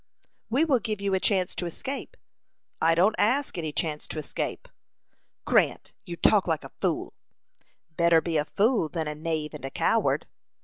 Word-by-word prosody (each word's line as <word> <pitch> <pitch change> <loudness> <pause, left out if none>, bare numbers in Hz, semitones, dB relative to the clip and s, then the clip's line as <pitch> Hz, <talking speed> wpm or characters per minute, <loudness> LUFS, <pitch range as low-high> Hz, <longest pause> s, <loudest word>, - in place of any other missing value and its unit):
"We 270 +8 +3
will 275 -6 +3
give 215 -3 -3
you 200 -1 -1
a 190 - +3
chance 185 -2 +1
to 175 - -2
escape." 275 - -6 0.6
"I 165 +1 +4
don't 190 +6 +4
ask 260 +7 +2
any 160 -3 -3
chance 150 0 -2
to - - -5
escape." 150 - -4 0.8
"Grant, - - +2
you 170 - -5
talk 200 +3 +4
like 160 -3 0
a - - -10
fool." - - -1 0.8
"Better 170 -1 +5
be 165 -1 -1
a 150 - +1
fool 210 -2 +1
than 160 -2 -3
a 150 - -2
knave 155 0 -3
and 150 - -9
a 135 - -3
coward." - - +1
170 Hz, 175 wpm, -27 LUFS, 160-215 Hz, 0.8 s, Better